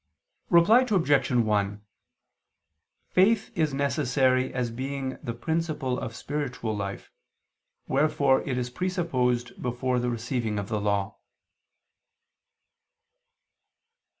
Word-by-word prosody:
Reply 205 Hz, +9 st, +6 dB
Obj. 155 Hz, -9 st, +3 dB
1: 105 Hz, -4 st, +1 dB, 1.3 s
Faith 200 Hz, +4 st, +3 dB
is 155 Hz, -4 st, +1 dB
necessary 135 Hz, -2 st, +1 dB
as 125 Hz, -2 st, -2 dB
being 130 Hz, +2 st, -4 dB
the 115 Hz, -, -4 dB
principle 155 Hz, -2 st, -2 dB
of 115 Hz, -2 st, -6 dB
spiritual 125 Hz, -7 st, -3 dB
life, 100 Hz, -1 st, -5 dB, 0.8 s
wherefore 140 Hz, -1 st, +2 dB
it 130 Hz, -2 st, -3 dB
is 125 Hz, 0 st, -2 dB
presupposed 130 Hz, -9 st, -1 dB
before 125 Hz, +1 st, -1 dB
the 125 Hz, 0 st, -1 dB
receiving 120 Hz, -2 st, -2 dB
of 100 Hz, -1 st, -4 dB
the 105 Hz, -1 st, -1 dB
Law. 100 Hz, 0 st, -1 dB
130 Hz, 95 wpm, -27 LUFS, 115-150 Hz, 1.3 s, Reply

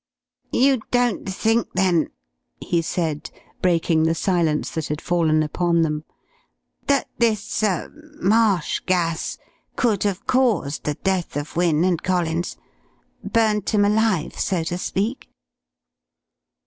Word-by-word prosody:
"You 265 Hz, -2 st, +3 dB
don't 245 Hz, -5 st, +1 dB
think, 225 Hz, +4 st, 0 dB
then," 180 Hz, -4 st, +2 dB, 0.5 s
he 170 Hz, -1 st, 0 dB
said, 160 Hz, -2 st, -2 dB, 0.3 s
breaking 165 Hz, -2 st, +2 dB
the 160 Hz, +1 st, +2 dB
silence 165 Hz, -4 st, 0 dB
that 160 Hz, -2 st, -3 dB
had 150 Hz, 0 st, -3 dB
fallen 160 Hz, -3 st, +2 dB
upon 170 Hz, +2 st, +1 dB
them, 150 Hz, -1 st, -2 dB, 0.8 s
"that 280 Hz, -1 st, +2 dB
this 225 Hz, -2 st, +1 dB
er 200 Hz, -5 st, -1 dB, 0.3 s
marsh 205 Hz, -4 st, +2 dB
gas 170 Hz, -3 st, 0 dB, 0.4 s
could 220 Hz, -6 st, +1 dB
have 200 Hz, -2 st, -1 dB
caused 240 Hz, -, +1 dB
the 150 Hz, -, -1 dB
death 190 Hz, -4 st, -1 dB
of 145 Hz, +3 st, -5 dB
Wynne 170 Hz, -2 st, +2 dB
and 180 Hz, -3 st, +1 dB
Collins? 175 Hz, -2 st, -1 dB, 0.7 s
Burnt 215 Hz, -3 st, +1 dB
'em 205 Hz, -1 st, +4 dB
alive, 210 Hz, -5 st, +1 dB
so 180 Hz, -4 st, 0 dB
to 175 Hz, +2 st, -3 dB
speak?" 215 Hz, +8 st, -2 dB
180 Hz, 120 wpm, -22 LUFS, 160-210 Hz, 0.8 s, em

